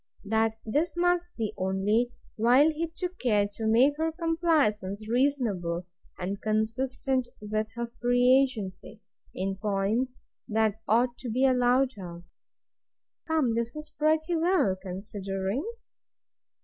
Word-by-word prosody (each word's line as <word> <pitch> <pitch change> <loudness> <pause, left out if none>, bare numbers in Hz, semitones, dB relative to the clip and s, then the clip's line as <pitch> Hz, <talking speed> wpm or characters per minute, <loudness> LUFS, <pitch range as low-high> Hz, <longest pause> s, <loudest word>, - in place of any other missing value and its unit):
That 220 +1 +1
this 300 +10 0
must 355 0 +2
be 220 -3 -2
only 200 +6 +1 0.2
while 250 +7 +5
he 325 +2 -2
took 360 +2 -6
care 210 -5 +2
to 220 +1 -3
make 255 +6 +4
her 320 +1 0
compliance 325 -9 +1 0.3
reasonable, 220 -10 0 0.3
and 195 +2 -4
consistent 250 +4 0
with 215 +1 -2
her 235 0 -2
free 245 +2 +3
agency, 215 -5 -4 0.4
in 195 +1 -2
points 215 +5 -1 0.3
that 220 0 +1
ought 240 +2 +2
to 250 - -5
be 255 +4 +2
allowed 255 0 +3
her. 175 -2 -8 1.0
Come, 310 -7 +2
this 235 +2 -2
is 305 0 -8
pretty 315 +3 +1
well, 330 - +2
considering. 195 - -4
235 Hz, 125 wpm, -28 LUFS, 210-285 Hz, 1.0 s, while